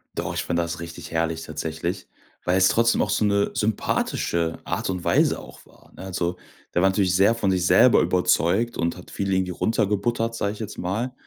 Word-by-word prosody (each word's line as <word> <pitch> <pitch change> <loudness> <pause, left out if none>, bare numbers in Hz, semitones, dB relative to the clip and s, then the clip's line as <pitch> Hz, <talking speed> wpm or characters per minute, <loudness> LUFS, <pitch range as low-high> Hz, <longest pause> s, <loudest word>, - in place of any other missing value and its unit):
Doch, - - -3
ich - - -2
find 85 - -2
das 85 0 -2
richtig 85 0 -8
herrlich, 80 0 -1
tatsächlich, 80 +4 -4 0.4
weil 90 +1 +2
es 95 - +5
trotzdem 115 0 +3
auch - - 0
so 110 - +1
'ne 100 0 +1
sympathische 85 -5 -1
Art - - -3
und 90 -2 -3
Weise - - +2
auch - - -13
war, - - -22
ne? - - -11
Also, 90 -2 -2 0.4
der 90 - +2
war 95 - +5
natürlich 95 -2 +1
sehr 100 +5 +4
von 100 -4 0
sich 90 -1 +1
selber - - +6
überzeugt 100 +9 +1
und 85 +1 -1
hat 90 - -13
viele 95 -1 -1
irgendwie 95 -1 0
runtergebuttert, 115 +3 0
sag 100 - -1
ich 105 - -9
jetzt 110 - -6
mal. 110 +8 -2
95 Hz, 200 wpm, -24 LUFS, 85-105 Hz, 0.4 s, selber